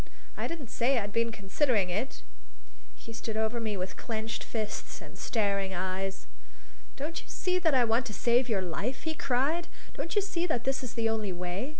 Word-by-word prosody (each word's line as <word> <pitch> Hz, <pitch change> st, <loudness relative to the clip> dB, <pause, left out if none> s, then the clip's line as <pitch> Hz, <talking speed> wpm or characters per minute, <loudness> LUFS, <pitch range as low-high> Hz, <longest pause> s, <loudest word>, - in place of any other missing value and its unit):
I -, -, -1 dB
didn't 310 Hz, -8 st, -5 dB
say 250 Hz, +3 st, +3 dB
I'd 205 Hz, -2 st, -1 dB
been 230 Hz, 0 st, +2 dB
considering 210 Hz, 0 st, +2 dB
that." 215 Hz, +10 st, -2 dB, 0.7 s
He 230 Hz, -, -9 dB
stood 220 Hz, -1 st, -3 dB
over 220 Hz, +2 st, +1 dB
me 215 Hz, -3 st, -1 dB
with 185 Hz, 0 st, -3 dB
clenched 225 Hz, 0 st, -2 dB
fists 215 Hz, -2 st, -3 dB
and -, -, -11 dB
starting 200 Hz, -4 st, +1 dB
eyes. 190 Hz, +1 st, -2 dB, 0.7 s
"Don't 305 Hz, +4 st, -3 dB
you -, -, -18 dB
see 365 Hz, 0 st, +1 dB
that 320 Hz, -5 st, +4 dB
I 250 Hz, -2 st, +6 dB
want 230 Hz, +2 st, +2 dB
to 215 Hz, -, -5 dB
save 245 Hz, +1 st, +4 dB
your 200 Hz, -4 st, +2 dB
life?" 200 Hz, +9 st, -2 dB
he 320 Hz, -, 0 dB
cried. 295 Hz, +5 st, +1 dB, 0.3 s
"Don't 335 Hz, -, -3 dB
you 415 Hz, -, +6 dB
see 360 Hz, -3 st, 0 dB
that 245 Hz, -8 st, +1 dB
this 270 Hz, 0 st, +1 dB
is 250 Hz, -, -5 dB
the 230 Hz, -1 st, +2 dB
only 220 Hz, -3 st, 0 dB
way? 180 Hz, +7 st, -2 dB
230 Hz, 195 wpm, -31 LUFS, 200-270 Hz, 0.7 s, I